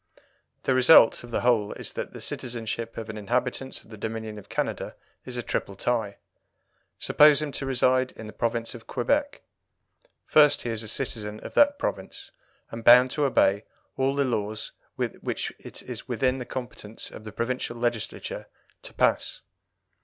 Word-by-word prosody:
The 135 - +2
result 130 -2 +7
of 120 - -10
the 115 - -1
whole 115 -4 +2
is - - -3
that - - -5
the - - -9
citizenship 115 -2 -4
of 115 -1 -5
an 110 -1 -6
inhabitant 125 +4 -2
of - - -20
the 110 - -10
Dominion 110 -1 -5
of 100 - -16
Canada - - -3 0.3
is 125 -1 -4
a 120 - -2
triple 100 - -2
tie. 110 -1 -1 0.8
Suppose 150 -1 +5
him 150 -1 -3
to 135 - -4
reside 130 0 +2
in 110 - -10
the 105 - -9
province 115 +1 -1
of 115 -3 -12
Quebec. 285 0 0 0.8
First, 150 -1 +5
he 120 - -2
is 110 -1 0
a 110 - -4
citizen 105 -3 -3
of - - -9
that 285 0 +5
province, - - -5 0.4
and 115 0 -7
bound 125 +2 +8
to 150 -1 +1
obey 105 -6 +3 0.3
all 135 +1 +1
the 140 -1 +2
laws 110 -3 -2 0.2
which - - -3
it - - -8
is - - -7
within 130 0 0
the 125 - -5
competence 120 -3 -6
of - - -10
the 110 - -8
provincial 120 +2 -3
Legislature 120 -2 -3 0.3
to - - -9
pass. - - +1
120 Hz, 170 wpm, -26 LUFS, 110-130 Hz, 0.8 s, bound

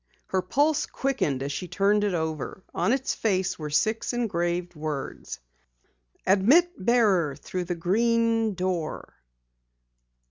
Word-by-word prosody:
Her 190 - +1
pulse 290 +10 +1
quickened 205 - -1
as 140 - -3
she 180 +6 -4
turned 205 +3 +2
it 200 -3 0
over. 160 +3 -3
On - - +1
its 265 0 0
face 190 -6 0
were 150 -1 -4
six 220 +11 0
engraved 175 -6 -1
words: 150 -3 -5 0.9
"Admit 250 - +5
Bearer 195 - +3
Through 180 +4 -5
The 175 0 -2
Green 225 +4 +1
Door." 180 -3 -3
190 Hz, 120 wpm, -26 LUFS, 170-230 Hz, 0.9 s, Admit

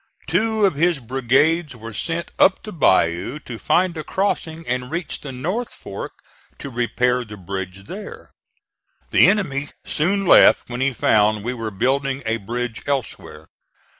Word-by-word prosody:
Two 215 +6 +1
of 190 - +2
his 170 +3 +2
brigades 135 +5 +1
were 115 -1 -9
sent 165 +9 -3
up 190 - +4
the 215 - -8
bayou 95 - +2
to 120 -4 -8
find 180 -1 +2
a 155 - -5
crossing 165 -4 -2
and 125 0 -2
reach 170 +2 -4
the 140 - -7
North 180 - -3
Fork 100 0 -8 0.4
to 140 - -7
repair 125 +1 0
the 105 -2 -10
bridge 95 0 -6
there. 200 - -9 0.8
The - - +6
enemy 145 -9 0 0.2
soon 195 +6 0
left - - +6
when 120 +1 -3
he 135 +1 +2
found 105 -3 +2
we 120 +3 -2
were 115 -3 -4
building 135 +6 -1
a 110 +1 0
bridge 120 +2 -4
elsewhere. 140 -5 -4
135 Hz, 155 wpm, -21 LUFS, 115-170 Hz, 0.8 s, The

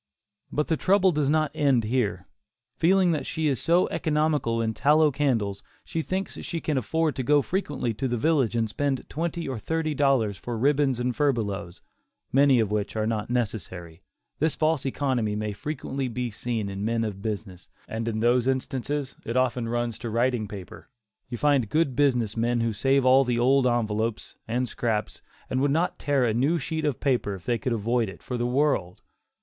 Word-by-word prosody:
But 150 - 0
the 160 - 0
trouble 190 +1 +4
does 150 -3 0
not 155 0 +2
end 140 -6 +2
here. 105 -5 -1 0.5
Feeling 185 +1 +3
that 155 -3 -2
she 160 - -2
is 135 -4 0
so 175 +2 +3
economical 150 -7 0
in 110 -1 0
tallow 150 +4 +4
candles, 115 -9 0 0.2
she 165 - -2
thinks 185 +5 -3
she 170 - -4
can 155 -2 -2
afford 155 +5 0
to - - 0
go 145 +2 +3
frequently 145 - -2
to 130 +5 -2
the 120 -1 -1
village 135 -4 +2
and 115 -1 +1
spend 135 +4 -2
twenty 170 +2 -3
or 130 -4 -3
thirty 160 +5 -1
dollars 130 -8 +2
for 120 +3 -5
ribbons 135 0 +2
and 125 0 -1
furbelows, 105 -10 -1 0.5
many 135 -1 +5
of 110 -3 0
which 105 0 -2
are 110 -1 0
not 110 -1 -2
necessary. 95 -8 -3 0.4
This 160 +1 +1
false 155 -3 +1
economy 125 -6 0
may 105 0 -2
frequently 135 +2 -4
be 125 0 -3
seen 110 0 -3
in 100 0 -5
men 115 +1 0
of 100 -3 -4
business, 100 -4 -5 0.2
and 115 +1 -4
in 110 -1 -1
those 120 +1 +3
instances 135 +1 -2
it 115 +2 -2
often 125 -2 +1
runs 120 -1 -2
to 120 - -4
writing 120 -1 0
paper. 100 +2 -10 0.4
You 120 - -4
find 140 -5 +2
good 155 -5 +1
business 125 -6 +2
men 120 +1 +1
who 115 -1 0
save 135 +5 +2
all 130 +1 +6
the 120 -2 0
old 130 +2 +4
envelopes, 110 -2 -1
and 125 +3 -1
scraps, 110 -3 -2 0.3
and 130 - -1
would 140 - +2
not 165 +5 0
tear 140 -3 +1
a 115 - +1
new 140 +9 +2
sheet 160 +1 -3
of 145 -5 -1
paper, 125 -7 0
if 90 - -12
they 120 -1 0
could 130 - -2
avoid 115 0 0
it, - - -12
for 125 - -4
the 120 0 -1
world. 125 -9 0
125 Hz, 190 wpm, -26 LUFS, 110-145 Hz, 0.5 s, all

